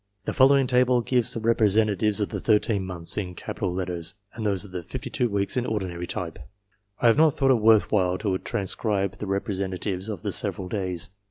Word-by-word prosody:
The - - -2
following 135 0 +5
table 125 0 +3
gives 125 -1 +1
the - - -3
representatives 110 -2 +2
of 105 - -1
the - - -4
13 105 -2 +2
months 90 0 -2
in 90 -3 -5
capital 95 0 -4
letters, 90 0 -3 0.2
and 115 - -6
those 100 -1 0
of 100 - -13
the 90 -1 -4
52 120 +8 -3
weeks 100 +3 -1
in 125 - +1
ordinary 90 -5 -3
type. 85 -3 -4 0.6
I - - -1
have 115 +2 +6
not 155 -2 +5
thought 135 -1 +3
it 120 -4 +3
worth 110 -1 +5
while 90 -3 +2
to 100 -3 -1
transcribe 100 0 -2
the 105 - -4
representatives 95 0 -2
of 100 -6 -5
the - - -1
several 90 -1 -2
days. 95 -4 -4
100 Hz, 195 wpm, -25 LUFS, 95-115 Hz, 0.6 s, have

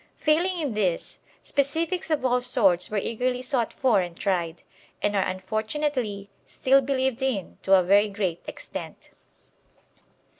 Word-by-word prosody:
Failing 345 +4 +1
in 290 -7 -2
this, 190 -5 -1 0.2
specifics 330 +6 0
of 300 -4 0
all 250 0 +2
sorts 210 -8 +3
were 215 - -2
eagerly 250 +4 -1
sought 250 -3 0
for 245 -7 +2
and 175 -1 -6
tried, 175 -4 -1 0.4
and 205 0 0
are 195 - +3
unfortunately 215 +3 -2 0.2
still 270 +1 +3
believed 265 -1 -1
in 255 -8 -2
to 195 - +5
a 185 - +5
very 200 +3 +4
great 195 -4 -2
extent. - - -8
230 Hz, 140 wpm, -25 LUFS, 195-270 Hz, 0.4 s, to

